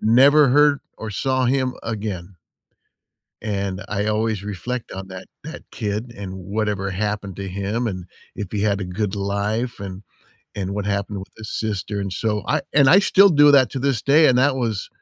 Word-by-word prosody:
never 135 +6 +6
heard 145 +1 +4 0.2
or 110 - -5
saw 130 +5 0
him 130 0 +1
again. 100 -5 -5 1.1
And 100 -3 -3
I 105 0 -1
always 110 -1 0
reflect 110 +5 -5
on 95 0 -7
that 95 0 -9 0.2
that 160 +2 -8
kid 110 +2 -4
and 95 -2 -6
whatever 100 +1 -2
happened 100 -1 -3
to 100 -1 -5
him 100 +5 -2
and 95 -5 -4 0.3
if 100 - -5
he 105 - -1
had 105 -2 +1
a - - -2
good 95 +3 -3
life 105 +4 -2
and 95 -1 -7 0.5
and 100 -1 -3
what 100 -1 -3
happened 100 0 -2
with 95 - -8
his 110 -1 -7
sister, 105 -1 -3
and 100 -1 -3
so, 105 +2 -1
I 150 0 +1
and 140 -2 +5
I 175 +8 +8
still 200 0 +6
do 145 -4 +6
that 135 -3 +6
to 135 - -3
this 135 -3 0
day, 150 +5 +5
and 125 - +4
that 135 +1 +3
was 115 -6 -2
105 Hz, 190 wpm, -22 LUFS, 100-125 Hz, 1.1 s, I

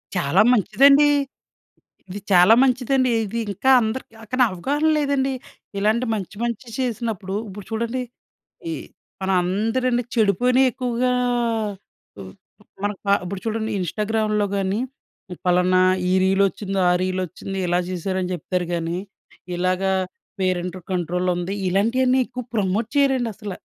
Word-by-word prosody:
చాలా 150 -6 +3
మంచిదండి! 275 +6 +5 1.0
ఇది 195 +3 -6
చాలా 180 +4 +7
మంచిదండి. 255 0 +2
ఇది 215 +3 -4
ఇంకా 260 +7 +1
అందరికి 225 +2 -3 0.2
కాని 255 0 +4
అవగాహన 280 - 0
లేదండి. 280 -2 0 0.5
ఇలాంటి 220 +5 +1
మంచి 195 -2 -6
మంచి 235 +1 -3
చేసినప్పుడు, 225 -6 -3
ఇప్పుడు 195 0 -9
చూడండి, 235 +3 -2 0.7
ఈ - - -2 0.5
మన 190 - -1
అందరని 225 +7 0
చెడుపోయినయి 245 +4 +3
ఎక్కువగా 250 0 -1 1.1
ఉ - - -6 0.6
మనకి 205 -1 -2
ప - - -3 0.2
ఇప్పుడు 185 +1 -5
చూడండి, 220 0 -2
ఇన్‌స్టాగ్రామ్‌లో 210 +2 0
గాని 195 +2 -1 0.7
పలానా 180 +1 +3 0.3
ఈ - - +2
రీలొచ్చింది, 195 +1 +1
ఆ - - +4
రీలొచ్చింది, 185 +1 -3
ఇలా 175 0 +1
చేసారు 185 +1 -2
అని 180 0 -3
చెప్తారు 180 0 -2
గాని 170 +1 -2 0.6
ఇలాగా 185 +2 0 0.5
పేరెంట్ 180 -1 -1 0.2
కంట్రోల్ 180 0 -1
ఉంది. 175 +3 -3
ఇలాంటియన్నీ 245 +7 +2
ఎక్కువ 250 0 -6
ప్రమోట్ 210 +1 0
చేయరండసల. 240 -7 0
210 Hz, 120 wpm, -22 LUFS, 185-250 Hz, 1.1 s, చాలా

